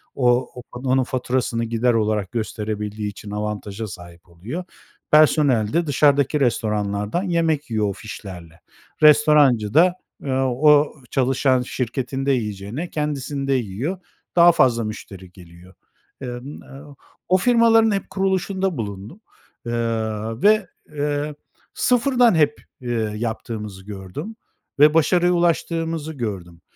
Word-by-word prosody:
O 125 -1 +2
o 125 - -8
onun 130 +1 0
faturasını 125 -2 -2
gider 115 +2 +1
olarak 105 -3 0
gösterebildiği 105 -2 -4
için 100 0 -10
avantaja 105 0 -4
sahip 85 -2 -12
oluyor. 105 - -7 0.5
Personel 145 -8 +4
de 170 0 +1
dışarıdaki 145 +1 +3
restoranlardan 105 - -1
yemek 165 -5 0
yiyor 110 -2 0
o - - -3
fişlerle. 95 -6 -10 0.4
Restorancı 150 -8 +5
da, 175 +3 +5 0.3
eee, 140 - -4
o 145 +3 +3 0.2
çalışan 130 0 +2
şirketinde 130 +2 -2
yiyeceğine 110 - -3
kendisinde 140 -2 -2
yiyor. 125 - -2 0.4
Daha 175 0 +7
fazla 120 -7 +2
müşteri 95 -4 -8
geliyor. 90 0 -16 0.5
Emm, 125 +2 -7
o 140 +1 -13 0.3
o 185 - +5
firmaların 225 +1 +4
hep 195 -2 -2
kuruluşunda 190 -2 -1
bulundum, 105 - -7 0.4
eee, 120 - -4 0.7
ve, 210 -2 +4 0.2
eee, 145 0 -2 0.4
sıfırdan 245 -3 +3
hep, 150 -2 +2 0.2
eee, 125 -1 -4 0.3
yaptığımızı 105 -3 -5
gördüm 105 - -7 0.4
ve 150 +1 +7
başarıya 175 +2 +3
ulaştığımızı 165 -2 -1
gördüm. 95 - -6
130 Hz, 115 wpm, -21 LUFS, 105-155 Hz, 0.7 s, Daha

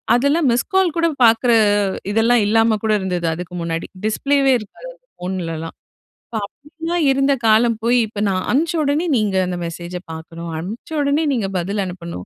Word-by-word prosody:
அதெல்லாம் 280 +4 +2
மிஸ்கால் 365 +7 +1
கூட 335 0 +3 0.2
பாக்குற 230 +2 +4 0.6
இதெல்லாம் 230 +2 +3
இல்லாம 225 0 +3
கூட 220 - +1
இருந்தது 180 -2 -2
அதுக்கு 175 +1 -7
முன்னாடி. 165 0 -3 0.2
டிஸ்ப்ளேவே 275 +5 +2
இருக்காது 215 - -11
அந்த - - -35
ஃபோன்லலாம். 165 -3 -5 0.5
இப்ப 225 - -6
அப்டிலாம் 325 +7 -4
இருந்த 275 +1 +2
காலம் 225 +1 +4
போய், 240 +1 +3
இப்ப 210 -1 -6
நான் 185 -1 -1
அனுப்ச்ச 315 +6 +1
உடனே 290 +4 0
நீங்க 210 -3 0
அந்த 180 -1 -3
மெசேஜ 170 +1 -7 0.2
பாக்கணும், 165 +1 -8
அனுப்ச 210 - -7
உடனே 285 +3 +1
நீங்க 215 -6 -1
பதில் 200 +4 -2
அனுப்பணும். 170 - -7
225 Hz, 155 wpm, -19 LUFS, 180-280 Hz, 0.6 s, பாக்குற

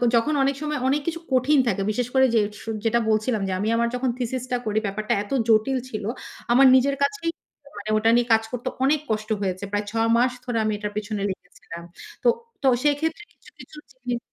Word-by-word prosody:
যখন 265 +7 +2
অনেক 275 0 +1
সময় 300 -2 -2
অনেক 285 +2 +2
কিছু 335 0 -2
কঠিন 265 +3 +3
থাকে 195 -3 0
বিশেষ 245 +2 -1
করে 265 0 +5
যে - - +5 0.2
সু 225 - -7 0.2
যেটা 235 +1 +3
বলছিলাম 215 0 +1
যে 190 - -2
আমি 210 - -1
আমার 235 0 +2
যখন 250 0 0
থিসিস 250 0 -3
টা 245 - +2
করি 215 0 +1
ব্যাপারটা 215 +2 -1
এত 205 - -15 0.2
জটিল 225 +4 +3
ছিল, 215 -3 -5 0.5
আমার 265 +3 +6
নিজের 275 +2 +3
কাছেই 280 +4 -1 0.5
মানে 205 +1 -6
ওটা 225 +1 +3
নিয়ে 240 0 +2
কাজ 225 0 +3
করতে 250 +1 -5 0.2
অনেক 290 +2 +3
কষ্ট 215 0 -2
হয়েছে। 185 0 -2
প্রায় 205 0 -1
৬ 225 0 +1
মাস 250 +1 +3
ধরে 240 -2 -2
আমি 215 - 0
এটার 210 0 -4
পেছনে 210 -1 -3
লেগেছিলাম। 170 -2 -9 0.4
তো, - - +2 0.4
তো - - +3 0.2
সেক্ষেত্রে 320 +6 0
কিছু, - - -20
কিছু 300 - -13 0.2
জিনিস 245 -2 -4
235 Hz, 205 wpm, -24 LUFS, 215-270 Hz, 0.5 s, আমার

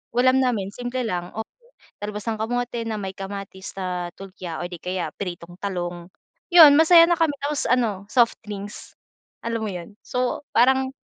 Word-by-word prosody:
ulam 255 +1 +4
namin, 225 -7 0
simple 245 +3 -4
lang, 175 -5 -3
oo, 220 - -3 0.6
talbos 210 0 -5
ng 220 - -2
kamote 240 +1 -2
na 215 -2 -3
may 190 -1 -4
kamatis 195 -1 -7
at 180 -1 -3
tulya 185 -3 -7
o 175 - -4
'di 175 - -7
kaya 180 +1 -3
pritong 175 -2 -6
talong, 175 -3 -4 0.5
yun, 305 -4 +10
masaya 330 +1 +8
na 345 - +3
kami. 325 -3 +2
Tapos 290 0 -1
ano, 225 -6 +1
soft 235 +2 +3
drinks, 205 0 -8 0.5
alam 230 -1 -2
mo - - -2
yun? 180 +4 -9
So 250 +3 -2
parang, 265 +2 +3
210 Hz, 170 wpm, -23 LUFS, 185-250 Hz, 0.6 s, yun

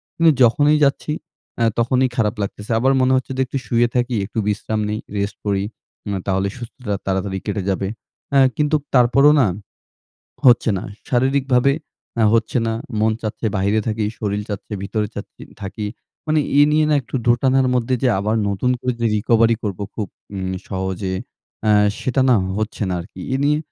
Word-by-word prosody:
কিন্তু 165 -1 +5
যখনই 145 +6 +4
যাচ্ছি 140 +2 -1 0.5
আ - - +4 0.2
তখনই 130 +2 +2
খারাপ 110 -1 +1
লাগতেছে। 105 +2 -5
আবার 130 +3 +3
মনে 130 0 +3
হচ্ছে 130 0 -1
যে - - +2
একটু 135 - -4
শুয়ে 120 0 +3
থাকি 125 0 +1
একটু 110 - -4
বিশ্রাম 105 +1 -1
নেই, 105 +1 -2 0.2
রেস্ট 100 -1 -2
করি। 100 -1 +1 0.4
উম 100 - -3
তাহলে 95 0 +1
সুস্থতা 120 -2 -6
তাড়াতাড়ি 95 0 -1
কেটে 105 -2 -2
যাবে 95 0 -1 0.4
অ্যা 140 - +4 0.2
কিন্তু 150 0 +2 0.2
তারপরও 130 +4 +6
না 120 - +4 1.0
হচ্ছে 120 -2 +6
না। - - -5 0.3
শারীরিকভাবে 130 +1 +2 0.5
আ - - +5
হচ্ছে 115 +1 +1
না, 115 - 0 0.3
মন 110 +1 +3
চাচ্ছে, 110 +1 -4
বাহিরে 100 +3 +2
থাকি, 110 -1 0
শরীল 105 -1 -2
চাচ্ছে, 105 +1 -6
ভিতরে 105 +1 -1
চাচ্ছি - - -9 0.2
থাকি। 100 +2 -5 0.4
মানে 155 0 +3 0.2
এ - - +8
নিয়ে 155 0 +3
না - - +3
একটু 130 - -7
দোটানার 130 +2 +3
মধ্যে 125 +1 0
যে 130 - +4
আবার 105 +3 0
নতুন 100 +6 0
করে 125 +1 -1
যে 115 - +3
recovery 115 +2 +3
করব 100 -3 -3
খুব 105 -3 -3 0.3
উম 95 -1 -3 0.2
সহজে 95 0 -3 0.5
অ্যা 110 - +3 0.3
সেটা 130 +1 0
না 125 - +6 0.2
হচ্ছে 110 0 -2
না - - -1
আরকি। 90 +1 -11
এ - - +2
নিয়ে 150 +1 +3
115 Hz, 175 wpm, -20 LUFS, 100-130 Hz, 1.0 s, এ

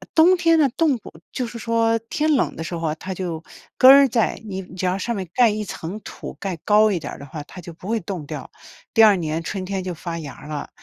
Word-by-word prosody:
呃 - - -14
冬 345 +3 +6
天 330 -2 +3
呢， 295 -3 +4
冻 315 -5 +3
不 - - -12 0.2
就 255 - -2
是 235 0 -8
说， 230 0 +1
天 300 +8 -1
冷 275 - +1
的 160 - -5
时 170 - -5
候， 165 -2 -2
它 190 +4 -6
就 170 -3 -4 0.4
根 255 - +9
儿 275 0 +9
在， 230 -2 0
你 190 -2 -4
只 185 0 -7
要 180 +1 +1
上 235 +4 -2
面 190 -2 -4
盖 245 -2 +5
一 210 0 -2
层 185 0 -6
土， - - -9
盖 190 -3 -3
高 215 +1 +5
一 185 - 0
点 160 - -7
儿 - - -12
的 140 - -9
话， 150 +2 -7
它 185 - -13
就 170 0 -10
不 175 - -13
会 230 +1 +1
冻 180 -3 -5
掉。 - - -7 0.4
第 225 - +6
二 210 -2 +7
年 160 -2 -2
春 190 +2 -4
天 190 0 -3
就 185 - -3
发 170 +1 -5
芽 150 -4 -7
儿 - - -13
了， 150 -2 -5
195 Hz, 285 characters per minute, -22 LUFS, 170-235 Hz, 0.4 s, 根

